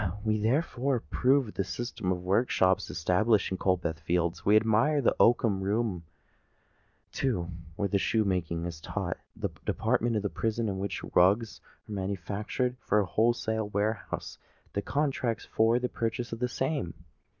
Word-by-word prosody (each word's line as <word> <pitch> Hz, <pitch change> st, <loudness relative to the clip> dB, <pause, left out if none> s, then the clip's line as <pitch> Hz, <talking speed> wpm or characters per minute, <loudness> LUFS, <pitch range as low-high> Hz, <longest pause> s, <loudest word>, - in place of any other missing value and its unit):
We 110 Hz, -1 st, +1 dB
therefore 130 Hz, +3 st, +1 dB
approve 130 Hz, +1 st, +2 dB
of -, -, -10 dB
the 100 Hz, -, -1 dB
system 95 Hz, -1 st, -3 dB
of 90 Hz, -1 st, -2 dB
workshops 95 Hz, -1 st, +2 dB
established 95 Hz, +6 st, +2 dB
in 95 Hz, -, -2 dB
Coldbath 85 Hz, -4 st, 0 dB
Fields: 85 Hz, +2 st, -1 dB
we 105 Hz, -, +4 dB
admire 115 Hz, +7 st, +4 dB
the 130 Hz, -, +2 dB
oakum 115 Hz, -4 st, +4 dB
room—the 95 Hz, +1 st, -1 dB, 0.2 s
room, 90 Hz, -5 st, -5 dB, 1.1 s
too, 90 Hz, -11 st, -1 dB, 0.2 s
where 100 Hz, -, 0 dB
shoe 110 Hz, +3 st, +2 dB
making 85 Hz, -3 st, -1 dB
is 85 Hz, -2 st, -6 dB
taught—and -, -, -5 dB
that -, -, -4 dB
department 120 Hz, 0 st, +1 dB
of 105 Hz, -, 0 dB
the 100 Hz, -, 0 dB
prison 115 Hz, 0 st, -1 dB
in 95 Hz, -1 st, -3 dB
which 100 Hz, -1 st, -3 dB
rugs 105 Hz, +5 st, +3 dB, 0.3 s
are -, -, -10 dB
manufactured 100 Hz, +6 st, -2 dB
for 105 Hz, -, +1 dB
a 105 Hz, -, +3 dB
wholesale 110 Hz, +1 st, +1 dB
warehouse 105 Hz, +1 st, -2 dB, 0.3 s
that 100 Hz, -, -2 dB
contracts 135 Hz, -6 st, -1 dB
for 115 Hz, +2 st, +3 dB
the 125 Hz, 0 st, 0 dB
purchase 115 Hz, 0 st, -3 dB
of 115 Hz, -, -5 dB
the 125 Hz, 0 st, 0 dB
same. 130 Hz, -, -2 dB
105 Hz, 160 wpm, -29 LUFS, 95-120 Hz, 1.1 s, we